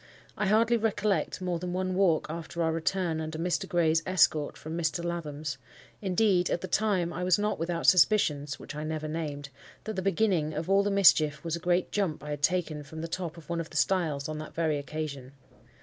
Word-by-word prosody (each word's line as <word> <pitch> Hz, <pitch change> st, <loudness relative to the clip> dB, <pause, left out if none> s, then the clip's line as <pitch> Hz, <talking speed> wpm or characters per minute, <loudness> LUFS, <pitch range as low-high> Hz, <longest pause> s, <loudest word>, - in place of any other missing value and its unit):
I 210 Hz, -, -1 dB
hardly 225 Hz, +3 st, +4 dB
recollect 210 Hz, -3 st, 0 dB
more 180 Hz, -2 st, -1 dB
than 180 Hz, +1 st, -4 dB
one 185 Hz, 0 st, -1 dB
walk 180 Hz, -4 st, +2 dB
after 165 Hz, +1 st, -4 dB
our 160 Hz, -, +1 dB
return 165 Hz, 0 st, -1 dB
under 155 Hz, 0 st, -5 dB
Mr. 170 Hz, 0 st, -1 dB
Gray's 165 Hz, -2 st, +2 dB
escort 155 Hz, -5 st, +2 dB
from 155 Hz, +1 st, -6 dB
Mr. 170 Hz, 0 st, -1 dB
Lathom's. 150 Hz, -5 st, -4 dB, 0.4 s
Indeed, 190 Hz, -2 st, +2 dB
at 170 Hz, -, -1 dB
the 185 Hz, -, -4 dB
time, 185 Hz, -3 st, +1 dB
I 180 Hz, -, -3 dB
was 180 Hz, -1 st, +4 dB
not 210 Hz, -3 st, -1 dB
without 170 Hz, +1 st, -2 dB
suspicions 150 Hz, -7 st, +4 dB
(which -, -, -9 dB
I 150 Hz, +1 st, -5 dB
never 155 Hz, 0 st, -3 dB
named) 150 Hz, -3 st, -4 dB, 0.3 s
that 220 Hz, 0 st, -5 dB
the 190 Hz, -, -1 dB
beginning 180 Hz, -5 st, +1 dB
of 155 Hz, +2 st, -3 dB
all 195 Hz, 0 st, +5 dB
the 200 Hz, -, 0 dB
mischief 155 Hz, -7 st, +4 dB
was 165 Hz, -1 st, -2 dB
a -, -, -5 dB
great 175 Hz, +1 st, 0 dB
jump 180 Hz, -8 st, -1 dB
I 150 Hz, -, -6 dB
had 145 Hz, -1 st, -4 dB
taken 160 Hz, -2 st, 0 dB
from 160 Hz, +2 st, -8 dB
the 165 Hz, -, -4 dB
top 170 Hz, -1 st, -4 dB
of 165 Hz, -, -13 dB
one 170 Hz, -1 st, -2 dB
of 160 Hz, -, -8 dB
the -, -, -5 dB
stiles 160 Hz, -7 st, +1 dB
on 155 Hz, 0 st, -4 dB
that 155 Hz, -, -9 dB
very 155 Hz, -3 st, +1 dB
occasion. 140 Hz, -3 st, -6 dB
170 Hz, 210 wpm, -29 LUFS, 155-185 Hz, 0.4 s, all